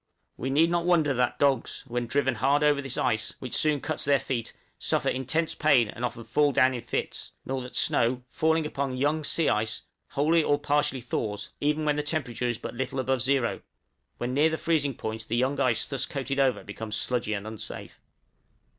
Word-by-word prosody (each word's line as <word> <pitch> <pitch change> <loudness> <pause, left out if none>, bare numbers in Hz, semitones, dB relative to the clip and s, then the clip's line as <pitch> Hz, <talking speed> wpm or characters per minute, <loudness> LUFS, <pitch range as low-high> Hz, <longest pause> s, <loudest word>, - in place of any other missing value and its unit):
We 130 - -3
need 160 +5 +4
not 175 0 +1
wonder 160 -5 +4
that 125 -1 0
dogs, 135 -4 +1
when 120 0 -3
driven 135 0 +1
hard 135 +6 +2
over 145 -1 +3
this 135 -3 -4
ice, 110 0 0
which 125 - -7
soon 150 -2 +2
cuts 155 - -3
their 140 0 +4
feet, 125 -3 -3 0.3
suffer - - +1
intense 155 +6 0
pain, 130 -8 +4
and 120 - -7
often 120 -1 -3
fall 145 +6 +2
down 130 -1 +4
in 120 - -4
fits; 120 - -4
nor 130 0 -2
that 125 -1 -9
snow, 125 +2 +2
falling 160 +3 +1
upon 140 -3 -2
young 150 +4 +1
(sea) 155 +2 +1
ice, 110 +1 0 0.2
wholly 160 +4 +3
or 145 - +3
partially 145 -2 0
thaws, 105 -3 -3
even 150 +1 +1
when 150 -1 +2
the - - +1
temperature 145 -6 -2
is 120 - -1
but - - -6
little 130 +2 -3
above 130 -1 0
zero; 130 -2 +1 0.6
when 120 +1 -2
near 150 +4 +4
the 160 - -2
freezing 145 -6 0
point 110 0 -5
the 115 - 0
young 135 +3 +1
ice 125 -4 +2
thus 135 -2 -2
coated 140 0 -3
over 135 -2 +2
becomes 110 -1 -5
sludgy 120 -3 -1
and 100 0 -4
unsafe. 110 -1 -7
135 Hz, 200 wpm, -27 LUFS, 120-145 Hz, 0.6 s, need